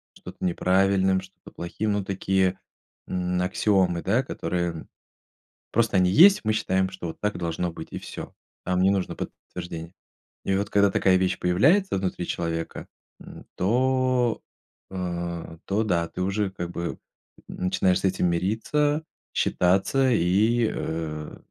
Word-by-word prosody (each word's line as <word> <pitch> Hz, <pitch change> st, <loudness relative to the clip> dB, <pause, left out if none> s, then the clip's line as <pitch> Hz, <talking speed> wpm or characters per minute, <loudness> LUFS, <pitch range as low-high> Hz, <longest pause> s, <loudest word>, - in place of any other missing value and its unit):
что-то -, -, -11 dB
неправильным, 95 Hz, +1 st, +2 dB
что-то -, -, -15 dB
плохим. 105 Hz, +5 st, -3 dB
Ну, 100 Hz, -1 st, -1 dB
такие, 95 Hz, -1 st, 0 dB, 0.5 s
м, 90 Hz, 0 st, -1 dB
аксиомы, 90 Hz, -2 st, +1 dB
да, 110 Hz, +7 st, +2 dB
которые 85 Hz, -, -3 dB, 0.8 s
просто 115 Hz, -3 st, +2 dB
они 90 Hz, -1 st, +4 dB
есть, 190 Hz, -, +8 dB
и -, -, -23 dB
мы 110 Hz, -, +2 dB
считаем, 95 Hz, -3 st, +1 dB
что 95 Hz, -2 st, -6 dB
вот 80 Hz, -, -7 dB
так 105 Hz, -2 st, -1 dB
должно 85 Hz, 0 st, -2 dB
быть, 80 Hz, -, -9 dB
и -, -, -5 dB
всё. -, -, -8 dB, 0.3 s
Там 90 Hz, 0 st, +1 dB
не 95 Hz, -, +5 dB
нужно 100 Hz, -2 st, 0 dB
подтверждение. 85 Hz, 0 st, -7 dB, 0.5 s
И 95 Hz, -, +1 dB
вот 100 Hz, +1 st, -1 dB
когда 100 Hz, 0 st, +4 dB
такая 95 Hz, -1 st, +3 dB
вещь 95 Hz, 0 st, 0 dB
появляется 150 Hz, -, +3 dB
внутри 95 Hz, -2 st, -2 dB
человека, 80 Hz, -1 st, -3 dB, 0.3 s
м, -, -, -12 dB
то, 125 Hz, +3 st, +1 dB, 0.5 s
э, 85 Hz, -3 st, -4 dB
то 105 Hz, +3 st, +1 dB
да. 85 Hz, -6 st, 0 dB
Ты -, -, -6 dB
уже 100 Hz, +2 st, 0 dB
как 85 Hz, -2 st, -5 dB
бы, 85 Hz, -, -4 dB
м, -, -, -6 dB, 0.5 s
начинаешь 90 Hz, 0 st, +1 dB
с -, -, -16 dB
этим 90 Hz, -1 st, +1 dB
мириться, 130 Hz, -, 0 dB, 0.3 s
считаться 100 Hz, +9 st, +2 dB
и, 110 Hz, +4 st, +3 dB
э, 75 Hz, -2 st, -4 dB
95 Hz, 145 wpm, -25 LUFS, 90-105 Hz, 0.8 s, есть